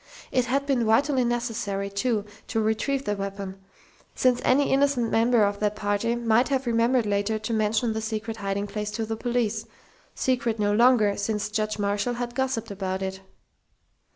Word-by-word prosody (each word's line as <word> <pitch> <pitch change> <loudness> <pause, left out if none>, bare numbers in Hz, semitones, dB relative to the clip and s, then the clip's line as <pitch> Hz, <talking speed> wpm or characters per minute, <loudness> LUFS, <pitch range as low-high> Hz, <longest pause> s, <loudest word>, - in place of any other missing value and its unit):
It 255 -2 +2
had 275 +3 0
been 270 -4 +1
vitally 265 +4 +3
necessary, 230 -5 -2
too, 210 +1 -1 0.2
to 225 - -1
retrieve 220 +6 0
the 205 - 0
weapon, 195 -1 -5 0.6
since 250 -1 +2
any 275 +3 +3
innocent 270 -4 +2
member 230 0 +4
of 200 0 0
that 210 0 0
party 205 +3 0
might 235 +1 +2
have 270 -1 0
remembered 235 +1 +2
later 205 +1 0
to 215 +2 -4
mention 220 +1 +1
the 220 - -3
secret 220 0 -4
hiding 200 0 -2
place 210 +1 -4
to 225 0 -2
the 225 +1 -3
police 230 -2 -1 0.5
secret 245 -3 0
no 205 -1 +1
longer 225 -3 +4
since 210 0 -2
Judge 215 0 -1
Marshall 205 +4 -1
had 240 0 -4
gossiped 250 -4 -2
about 190 -1 -3
it.... 190 0 -4
225 Hz, 170 wpm, -26 LUFS, 205-245 Hz, 0.6 s, member